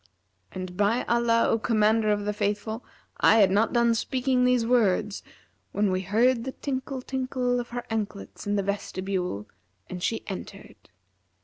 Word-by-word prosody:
And 185 -1 -6
by 210 +5 +2
Allah, 235 -1 +2
O 225 - +2
Commander 215 0 +2
of 205 -1 0
the 210 - -1
Faithful, 210 +3 -2 0.3
I - - +5
had 200 -4 +5
not 210 +4 +2
done 235 -1 +3
speaking 255 +2 +1
these 250 -2 +3
words, 215 -4 +2 0.5
when 205 -1 +1
we 185 0 0
heard 230 +5 +2
the 265 +1 -5
tinkle 265 -1 -4
tinkle 255 -2 -1
of 240 - -5
her 245 0 -4
anklets 210 -2 -4
in 205 - +1
the 200 - +1
vestibule 185 - -3 0.4
and 180 -1 -5
she 225 +4 -1
entered. 190 - -9
220 Hz, 155 wpm, -26 LUFS, 200-245 Hz, 0.5 s, I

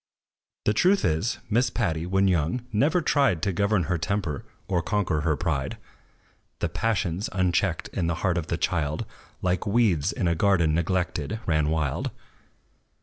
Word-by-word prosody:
The 105 - +3
truth 190 - +3
is, 90 +10 0
Miss 120 +2 +2
Patty, 80 -4 -1
when 95 +1 +2
young, 90 +7 0
never 150 - +3
tried 140 - +2
To 100 - +2
govern 100 0 +2
her 85 0 -1
temper, 90 -6 -2 0.2
or 90 -3 +1
conquer 90 -5 0
her 80 0 +1
pride. 75 -5 -2 0.8
The - - -1
passions, 100 -4 -1
unchecked 90 -1 +1
in 85 -4 -2
the 85 - 0
heart 90 -2 +2
of 80 - -6
the - - -1
child, 75 0 -1 0.4
Like 90 +3 0
weeds 100 -9 +2
in 90 - -1
a 85 - +3
garden 85 -3 +3
neglected, 90 +6 -1
ran 75 -2 +2
wild. 80 -4 -1
90 Hz, 155 wpm, -26 LUFS, 80-105 Hz, 0.8 s, The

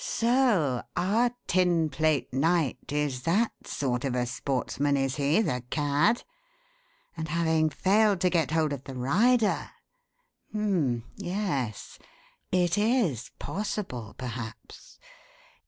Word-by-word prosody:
"So 230 - +2 0.2
our 215 +7 +2 0.2
Tinplate 160 -6 +1
Knight 145 -3 0
is 145 -3 -1
that 200 - +2 0.2
sort 125 -3 -2
of 135 -3 -1
a 125 -1 +1
sportsman, 140 +2 -1
is 135 0 -1
he, 145 +9 +3
the 125 - -2
cad? 150 +10 +2 0.9
And 160 - -4
having 160 -1 +2
failed 200 +4 +3
to 180 - +3
get 165 -4 +2
hold 155 -2 +1
of 140 -1 -7
the 135 - -7
rider 210 - +2 0.8
H'm! 175 - 0
Yes. 175 - -3 0.5
It 180 +1 +2
is 210 - +1
possible 185 - -4
perhaps. 120 -3 -8
155 Hz, 110 wpm, -28 LUFS, 135-195 Hz, 0.9 s, he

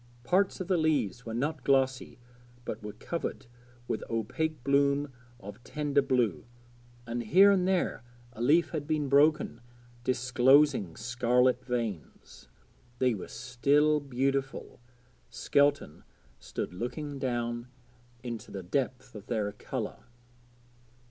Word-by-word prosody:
Parts 190 +8 +1
of 185 - -4
the 185 -2 +2
leaves 125 - 0
were 115 - -4
not 145 +2 -2
glossy 135 -1 +1 0.5
but - - -5
were 105 -1 -7
covered 165 +10 -5 0.4
with 110 - -2
opaque 120 +6 -2
bloom 140 0 +2 0.3
of 105 +3 -11
tender 145 -1 0
blue, 125 - 0 0.6
and 120 +1 -3
here 185 - +6
and 185 -2 +2
there 185 -10 0 0.3
a 115 - -8
leaf 155 +8 +3
had 150 -3 -4
been 150 -3 0
broken, 145 -4 +3 0.4
disclosing 125 - +3
scarlet 125 +2 +1
veins. 115 - -5 0.5
They 125 0 +2
were 100 - -7 0.3
very 150 +2 +5
beautiful 135 0 -2 0.5
Skelton 140 - +1 0.4
stood - - -5
looking 140 - -5
down 120 -2 -2 0.6
into 120 -3 -6
their 95 -2 -6
depth 130 +5 -2
of 105 +1 -10 0.3
colour. 120 -5 -5
130 Hz, 115 wpm, -29 LUFS, 120-145 Hz, 0.6 s, here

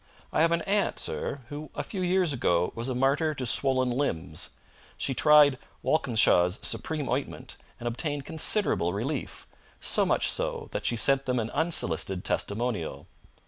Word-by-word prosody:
I - - +2
have 165 +1 +4
an 170 -1 +1
aunt, 205 0 0
sir, 140 - -3
who 145 0 -7
a - - -2
few 195 - -5
years 180 -3 +2
ago 90 -8 +1
was 115 +3 -3
a 130 - -2
martyr 140 +4 +1
to 130 - -4
swollen 130 +1 +1
limbs. 85 - -2 0.5
She 135 - -1
tried 145 -1 +5 0.2
Walkinshaw's 105 - +3
Supreme 155 -4 -2
Ointment 130 +3 -3 0.2
and 120 - -5
obtained 145 +3 -3
considerable 160 - +2
relief 130 +8 -4 0.3
so - - +2
much - - +1
so - - -3
that - - -3
she 120 - +1
sent 135 +3 +3
them 125 0 +1
an 115 0 -3
unsolicited 95 - 0
testimonial. 110 -5 -2
135 Hz, 155 wpm, -27 LUFS, 115-155 Hz, 0.5 s, tried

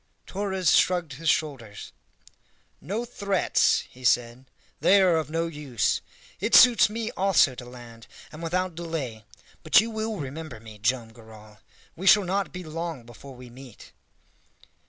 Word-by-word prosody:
Torres 190 -3 0
shrugged 175 -5 +1
his 160 +4 -2
shoulders. 135 - -3 0.9
"No 210 +9 -4
threats," 200 -5 +1
he 130 - -17
said; 120 +1 0 0.3
"they 200 +1 +5
are 185 -3 +4
of 160 -2 -2
no 165 +1 -1
use. 145 - -2 0.4
It 215 +5 +1
suits 245 -3 +7
me 225 +1 -4
also 190 -8 +3
to 125 0 -10
land, 120 -2 -13 0.2
and 155 +1 -11
without 180 +2 -2
delay. 155 -10 -6 0.4
But - - +5
you 225 +2 -1
will 220 0 -3
remember 145 -3 -7
me, 110 -1 -13
Joam 120 +1 -1
Garral. 110 -2 -16 0.4
We 190 +4 -5
shall 205 +1 +7
not 195 +2 -2
be 180 0 -7
long 165 -4 -6
before 130 +3 -13
we 125 -1 -13
meet." 125 -2 -14
155 Hz, 150 wpm, -25 LUFS, 125-185 Hz, 0.9 s, suits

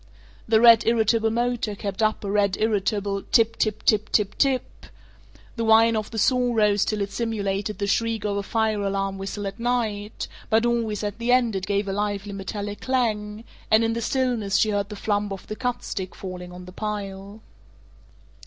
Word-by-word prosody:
The 220 -1 +4
red 230 -1 +8
irritable 225 -1 +3
motor 235 -2 -1
kept 200 +1 -4
up 215 0 +1
a 200 - -3
red 200 -2 +2
irritable 205 -2 0
"tip 230 +2 +2
tip 215 -1 -1
tip 215 0 +3
tip 205 -2 +2
tip - - -27
tip." 270 -2 0 0.7
The 230 - -1
whine 225 +1 +5
of 215 -1 -2
the 225 - -7
saw 245 +2 +2
rose 210 -2 +3
till 215 -1 -1
it 200 0 -2
simulated 205 -2 -2
the 200 - -1
shriek 225 +1 0
of 205 -1 0
a 200 - 0
fire 220 0 0
alarm 195 -1 -2
whistle 195 +1 -5
at 195 +3 -5
night, 225 -4 -2 0.2
but 220 +1 +3
always 230 -3 0
at 205 +1 -4
the 235 +1 0
end 245 -4 +3
it 190 -1 -3
gave 200 0 0
a 195 - -2
lively 205 0 -2
metallic 205 +1 -5
clang, 220 -4 -1 0.3
and 220 +1 +5
in 225 0 +1
the 235 - -3
stillness 235 -5 0
she 215 - +3
heard 200 0 -1
the 210 - -6
flump 205 0 -1
of 195 - -6
the 215 - -6
cut 245 +1 -3
stick 190 -2 -5
falling 180 -2 -7
on 180 0 -10
the 180 - -10
pile. 200 0 -5
210 Hz, 195 wpm, -24 LUFS, 200-225 Hz, 0.7 s, red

